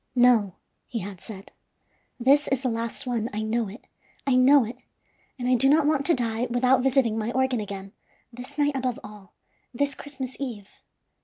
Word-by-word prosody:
"No," 240 Hz, -6 st, +4 dB, 0.3 s
he 235 Hz, -, -5 dB
had 195 Hz, -3 st, -6 dB
said; 200 Hz, -2 st, -10 dB, 0.7 s
"this 280 Hz, +4 st, +4 dB
is 270 Hz, -1 st, -1 dB
the 255 Hz, -, +1 dB
last 230 Hz, +1 st, -2 dB
one, 235 Hz, -2 st, -2 dB
I 215 Hz, +1 st, -2 dB
know 225 Hz, +1 st, -1 dB
it. 205 Hz, +6 st, -11 dB, 0.4 s
I 275 Hz, -, +2 dB
know 265 Hz, +2 st, +6 dB
it, 235 Hz, +3 st, -8 dB, 0.6 s
and 245 Hz, -1 st, -3 dB
I 255 Hz, -, +3 dB
do 255 Hz, +2 st, +3 dB
not 300 Hz, +1 st, +4 dB
want 295 Hz, -2 st, +2 dB
to 340 Hz, -, +4 dB
die 235 Hz, -1 st, -1 dB
without 250 Hz, +2 st, +3 dB
visiting 250 Hz, -4 st, +2 dB
my 220 Hz, +2 st, -2 dB
organ 260 Hz, -2 st, +1 dB
again, 195 Hz, -1 st, -7 dB, 0.4 s
this 255 Hz, +4 st, -10 dB
night 290 Hz, -1 st, +1 dB
above 255 Hz, -2 st, -2 dB
all, 205 Hz, -3 st, -13 dB, 0.4 s
this 285 Hz, +3 st, 0 dB
Christmas 265 Hz, -2 st, -7 dB
Eve. 230 Hz, -8 st, -6 dB
245 Hz, 180 wpm, -25 LUFS, 220-270 Hz, 0.7 s, know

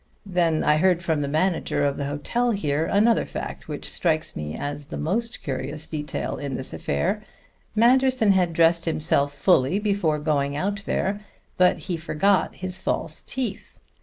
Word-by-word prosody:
Then 175 Hz, -4 st, +1 dB
I 150 Hz, 0 st, +4 dB
heard 175 Hz, +1 st, +3 dB
from 160 Hz, -3 st, 0 dB
the 140 Hz, -, -1 dB
manager 160 Hz, +1 st, +1 dB
of 140 Hz, -1 st, +1 dB
the 140 Hz, -, -3 dB
hotel 190 Hz, +13 st, -1 dB
here 155 Hz, -8 st, 0 dB
another 220 Hz, +3 st, +3 dB
fact, -, -, -6 dB
which -, -, -5 dB
strikes 160 Hz, -2 st, -1 dB
me 75 Hz, 0 st, -4 dB
as 145 Hz, 0 st, -4 dB
the -, -, -6 dB
most 230 Hz, +9 st, -2 dB
curious 140 Hz, +3 st, -4 dB
detail 150 Hz, -2 st, -4 dB
in 140 Hz, -2 st, -4 dB
this 130 Hz, -, -6 dB
affair. 70 Hz, 0 st, -1 dB, 0.5 s
Manderson 250 Hz, -1 st, +4 dB
had 180 Hz, -3 st, +3 dB
dressed 165 Hz, +1 st, +3 dB
himself 150 Hz, -3 st, 0 dB
fully 150 Hz, +1 st, +3 dB
before 200 Hz, -7 st, +1 dB
going 145 Hz, -2 st, 0 dB
out 200 Hz, +4 st, -2 dB
there, 200 Hz, +2 st, -1 dB, 0.3 s
but 180 Hz, 0 st, +4 dB
he 175 Hz, -, -4 dB
forgot 170 Hz, +3 st, +1 dB
his 185 Hz, 0 st, -5 dB
false 160 Hz, -4 st, -2 dB
teeth. 260 Hz, -2 st, -5 dB
165 Hz, 165 wpm, -24 LUFS, 145-195 Hz, 0.5 s, I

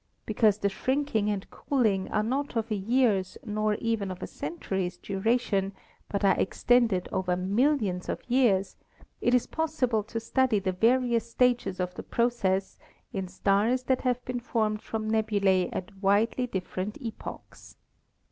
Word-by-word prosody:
Because 215 Hz, -1 st, +3 dB
the 200 Hz, -, 0 dB
shrinking 240 Hz, 0 st, 0 dB
and 200 Hz, -2 st, -2 dB
cooling 215 Hz, -9 st, 0 dB
are 215 Hz, -, +1 dB
not 270 Hz, +4 st, -2 dB
of 225 Hz, 0 st, -1 dB
a -, -, +2 dB
year's 205 Hz, -2 st, +1 dB
nor 215 Hz, -1 st, 0 dB
even 225 Hz, -3 st, -1 dB
of 185 Hz, -1 st, -6 dB
a -, -, -1 dB
century's 180 Hz, +3 st, -4 dB
dura 205 Hz, +6 st, +1 dB
tion, 200 Hz, -5 st, -1 dB, 0.4 s
but 200 Hz, 0 st, 0 dB
are 195 Hz, -, +4 dB
extended 225 Hz, -4 st, +2 dB
over 180 Hz, -1 st, 0 dB
millions 200 Hz, -1 st, +1 dB
of -, -, -4 dB
years, 235 Hz, -7 st, +2 dB, 0.4 s
it 245 Hz, -, +3 dB
is 250 Hz, -, +2 dB
possible 285 Hz, -9 st, 0 dB
to 230 Hz, +1 st, -4 dB
study 245 Hz, 0 st, +2 dB
the 190 Hz, -1 st, 0 dB
various 235 Hz, +3 st, +2 dB
stages 245 Hz, -6 st, +1 dB
of 180 Hz, 0 st, -2 dB
the -, -, -6 dB
process 195 Hz, -5 st, 0 dB, 0.3 s
in 190 Hz, -2 st, -3 dB
stars 205 Hz, +7 st, +1 dB
that 260 Hz, 0 st, +1 dB
have 250 Hz, -1 st, -1 dB
been 250 Hz, -1 st, -3 dB
formed 215 Hz, -3 st, -1 dB
from 220 Hz, -1 st, -4 dB
nebulae 205 Hz, -4 st, +2 dB
at 185 Hz, -, -5 dB
widely 210 Hz, +6 st, +2 dB
different 190 Hz, 0 st, -4 dB
epochs. 230 Hz, -5 st, -9 dB
215 Hz, 155 wpm, -28 LUFS, 195-245 Hz, 0.4 s, are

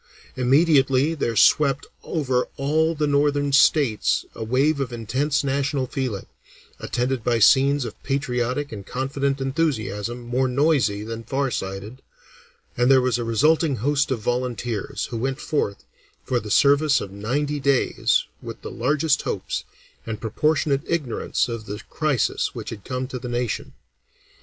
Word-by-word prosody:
Immediately 135 Hz, +1 st, +3 dB
there 120 Hz, -7 st, -2 dB
swept 140 Hz, +3 st, +4 dB, 0.2 s
over 130 Hz, -6 st, 0 dB
all 160 Hz, +4 st, +1 dB
the 150 Hz, 0 st, 0 dB
northern 145 Hz, 0 st, +1 dB
states 135 Hz, -4 st, +3 dB
a -, -, -6 dB
wave 135 Hz, +6 st, +1 dB
of 135 Hz, -3 st, -2 dB
intense 130 Hz, +6 st, -1 dB
national 140 Hz, 0 st, 0 dB
feeling, 125 Hz, -6 st, -3 dB, 0.5 s
attended 125 Hz, -1 st, -2 dB
by 120 Hz, 0 st, +2 dB
scenes 135 Hz, +4 st, +4 dB
of 115 Hz, -, -8 dB
patriotic 135 Hz, 0 st, -1 dB
and 105 Hz, -3 st, -7 dB
confident 135 Hz, +1 st, -1 dB
enthusiasm 125 Hz, -, -2 dB
more 125 Hz, +2 st, 0 dB
noisy 130 Hz, -6 st, +2 dB
than 115 Hz, +1 st, -6 dB
far 135 Hz, +3 st, -1 dB
sighted, 95 Hz, +7 st, -5 dB, 0.7 s
and 120 Hz, +1 st, +2 dB
there 135 Hz, -1 st, +7 dB
was 125 Hz, -1 st, +1 dB
a -, -, -1 dB
resulting 145 Hz, +6 st, +2 dB
host 140 Hz, +4 st, +1 dB
of 130 Hz, -4 st, -1 dB
volunteers, 120 Hz, -2 st, -2 dB
who 115 Hz, -, -3 dB
went 135 Hz, +4 st, -2 dB
forth 105 Hz, -12 st, -2 dB, 0.4 s
for 125 Hz, -, 0 dB
the 105 Hz, -, -8 dB
service 140 Hz, +5 st, +4 dB
of 100 Hz, -, -6 dB
ninety 140 Hz, +9 st, -2 dB
days 140 Hz, -2 st, +2 dB, 0.2 s
with -, -, -8 dB
the -, -, -6 dB
largest 145 Hz, +4 st, +1 dB
hopes, -, -, -3 dB, 0.4 s
and 110 Hz, -2 st, -5 dB
proportionate 140 Hz, +4 st, +1 dB
ignorance 155 Hz, -8 st, -1 dB
of 115 Hz, -3 st, -6 dB
the 105 Hz, +1 st, -5 dB
crisis 150 Hz, -7 st, 0 dB
which -, -, -6 dB
had 105 Hz, -3 st, -8 dB
come 130 Hz, 0 st, -3 dB
to 130 Hz, -1 st, -6 dB
the 125 Hz, 0 st, -6 dB
nation. 120 Hz, -1 st, -3 dB
130 Hz, 145 wpm, -23 LUFS, 120-145 Hz, 0.7 s, there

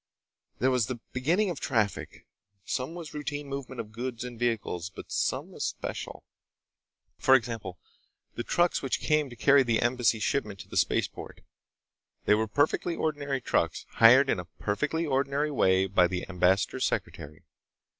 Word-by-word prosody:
There 130 Hz, +2 st, +2 dB
was 125 Hz, -4 st, +1 dB
the 125 Hz, -2 st, -4 dB
beginning 175 Hz, +11 st, +1 dB
of 165 Hz, -, -6 dB
traffic. 110 Hz, -6 st, -2 dB, 0.4 s
Some 130 Hz, +6 st, -3 dB
was 170 Hz, -3 st, -8 dB
routine 145 Hz, -1 st, -4 dB
movement 135 Hz, -2 st, -6 dB
of 110 Hz, -2 st, -6 dB
goods 120 Hz, +1 st, -5 dB
and 120 Hz, -2 st, -8 dB
vehicles. 110 Hz, -7 st, -1 dB
But -, -, -11 dB
some -, -, -1 dB
was -, -, -6 dB
special. -, -, -5 dB, 1.0 s
For 130 Hz, -, +6 dB
example, 115 Hz, -7 st, -2 dB, 0.6 s
the -, -, -4 dB
trucks 175 Hz, +6 st, +1 dB
which 135 Hz, -, -1 dB
came 150 Hz, -2 st, +1 dB
to 120 Hz, -, -10 dB
carry 140 Hz, +4 st, +5 dB
the 115 Hz, -4 st, +1 dB
Embassy 120 Hz, -2 st, +2 dB
shipment 105 Hz, -2 st, -1 dB
to -, -, -13 dB
the -, -, -10 dB
spaceport. -, -, -1 dB, 0.8 s
They -, -, +5 dB
were 110 Hz, +1 st, +1 dB
perfectly 145 Hz, +7 st, +1 dB
ordinary 145 Hz, -4 st, -2 dB
trucks, 85 Hz, -8 st, 0 dB
hired 125 Hz, +5 st, +7 dB
in -, -, 0 dB
a 90 Hz, -, -6 dB
perfectly 150 Hz, -, -2 dB
ordinary 140 Hz, +1 st, 0 dB
way 95 Hz, -8 st, +3 dB
by 95 Hz, -2 st, +3 dB
the 90 Hz, 0 st, -4 dB
ambassador's 95 Hz, +2 st, +1 dB
secretary. 75 Hz, +1 st, -5 dB
125 Hz, 155 wpm, -28 LUFS, 105-140 Hz, 1.0 s, hired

